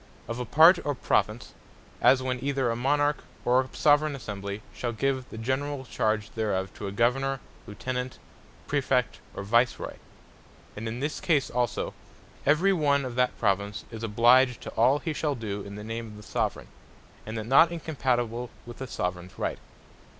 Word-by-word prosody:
Of 115 +1 -4
a 125 - -2
Part, 165 - +6
or 145 -1 -1
Province; 110 -2 0 0.5
as 130 -1 +5
when 130 -1 -2
either 135 -3 +1
a - - -1
Monarch, 145 +4 +1 0.2
or 125 +1 +5
a 130 - -7
Soveraign 145 0 +3
Assembly, 100 -4 -6
shall 120 -1 -3
give 130 +2 -1
the - - -9
generall 130 +4 -2
charge 110 -3 -1
thereof 95 -4 -2
to 100 - -6
a - - -4
Governour, 130 +5 +1 0.3
Lieutenant, 125 +4 -4 0.5
Praefect, 130 -4 0 0.2
or - - -4
Vice 115 +4 +3
Roy: - - -7 0.8
And 110 +2 -5
in 115 +3 -4
this 150 +2 -2
case 150 -6 +1
also, 120 -2 -1 0.5
every 170 +7 +4
one 140 -5 +2
of 125 - -4
that 125 +1 +1
Province, 100 -1 0
is 110 -1 -7
obliged 120 +3 +4
to - - -7
all 130 +5 +4
he 160 +1 -3
shall 150 -1 -1
doe 105 -4 -4
in 100 0 -8
the 105 - -7
name 115 +1 -5
of 105 -1 -11
the 105 - -11
Soveraign, - - -2 0.6
and 110 +1 -4
that 110 - -4
not 140 +8 +6
incompatible 125 -7 -1 0.2
with 120 0 -10
the 130 - -5
Soveraigns 90 -4 -4
Right. - - -2
125 Hz, 175 wpm, -27 LUFS, 110-135 Hz, 0.8 s, Part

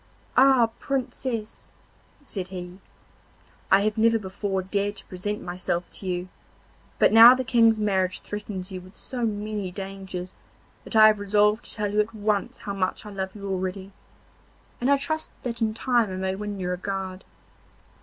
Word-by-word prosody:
'Ah, 260 -3 +5
Princess!' 255 -4 -4 0.5
said 195 -9 -5
he, 180 0 -8 0.9
'I 195 +1 +7
have 215 +1 0
never 230 +1 +4
before 195 -1 -3
dared 200 +2 -1
to 195 - -10
present 205 +3 -4
myself 175 0 -3
to 190 - -8
you, 180 0 -2 0.7
but - - +4
now 230 +3 +10
the 260 - -2
King's 230 -2 +4
marriage 190 -3 0
threatens 205 -2 -6
you 185 -1 -6
with 185 +2 -16
so 250 -2 -4
many 210 -2 -2
dangers 190 -1 -7 0.5
that - - -8
I 215 0 +9
have 215 -1 +5
resolved 210 +2 +2
to - - -3
tell 210 -1 -2
you 210 - +2
at 210 +2 0
once 210 -1 -1
how 200 - -4
much 190 +1 -2
I 210 - -8
love 190 -1 -4
you 200 -1 -7
already, 190 0 -3 0.9
and 250 - +1
I 280 - +5
trust 315 +3 -2
that 235 -2 -4
in 220 -1 +1
time 240 -3 +2
I 185 - -5
may 190 0 -1
win 205 0 -5
your 180 -1 -2
regard. 190 0 -4
205 Hz, 170 wpm, -25 LUFS, 190-220 Hz, 0.9 s, now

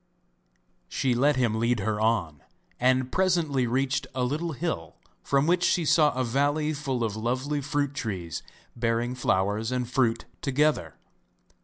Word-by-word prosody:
She 130 -2 0
let 140 +5 +3
him 120 -4 +1
lead 115 -1 +1
her 105 +1 -1
on, 95 -10 0 0.4
and 130 0 +2
presently 170 -9 +1
reached 130 +4 0
a 130 - 0
little 155 +6 -1
hill, 120 - -4 0.3
from 140 +1 +1
which 175 +2 +2
she 175 -2 +2
saw 150 0 +4
a 130 - 0
valley 145 +5 +1
full 135 -5 -2
of 110 -2 -2
lovely 130 +6 -1
fruit 145 0 -1
trees, 95 - -4 0.3
bearing 115 +1 0
flowers 105 -1 0
and 125 -1 -1
fruit 120 -2 +1 0.2
together. 140 - +1
130 Hz, 145 wpm, -27 LUFS, 115-145 Hz, 0.4 s, saw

